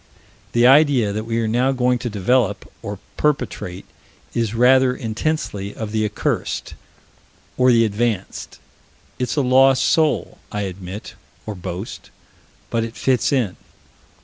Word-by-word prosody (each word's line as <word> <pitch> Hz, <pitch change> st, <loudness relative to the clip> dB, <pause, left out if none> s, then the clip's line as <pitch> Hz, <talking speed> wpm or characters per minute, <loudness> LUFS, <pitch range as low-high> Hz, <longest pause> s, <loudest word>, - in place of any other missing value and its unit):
The 120 Hz, +1 st, +4 dB
idea 135 Hz, -6 st, +5 dB
that 110 Hz, +1 st, -3 dB
we 115 Hz, 0 st, -1 dB
are 110 Hz, -, 0 dB
now 125 Hz, +4 st, +2 dB
going 125 Hz, -1 st, +1 dB
to 120 Hz, -, -3 dB
develop, 105 Hz, 0 st, +1 dB
or 100 Hz, 0 st, -5 dB, 0.2 s
perpetrate, 125 Hz, -10 st, -1 dB, 0.5 s
is 115 Hz, -2 st, -1 dB
rather 130 Hz, +1 st, +5 dB
intensely 110 Hz, -4 st, -3 dB
of 110 Hz, -2 st, -5 dB
the 110 Hz, 0 st, 0 dB
accursed, 105 Hz, -1 st, -2 dB, 0.8 s
or 125 Hz, 0 st, +4 dB
the 115 Hz, -1 st, +5 dB
advanced. 110 Hz, -1 st, -2 dB, 0.6 s
It's 125 Hz, -2 st, -1 dB
a 145 Hz, -, +2 dB
lost 130 Hz, +1 st, +5 dB
soul, 155 Hz, -2 st, +1 dB
I 105 Hz, -, -2 dB
admit 95 Hz, +1 st, -6 dB, 0.3 s
or 110 Hz, -, -4 dB
boast 90 Hz, +2 st, -7 dB, 0.6 s
but 115 Hz, -1 st, +1 dB
it 115 Hz, 0 st, -6 dB
fits 130 Hz, -3 st, +1 dB
in. 120 Hz, -10 st, 0 dB
115 Hz, 135 wpm, -21 LUFS, 105-130 Hz, 0.8 s, idea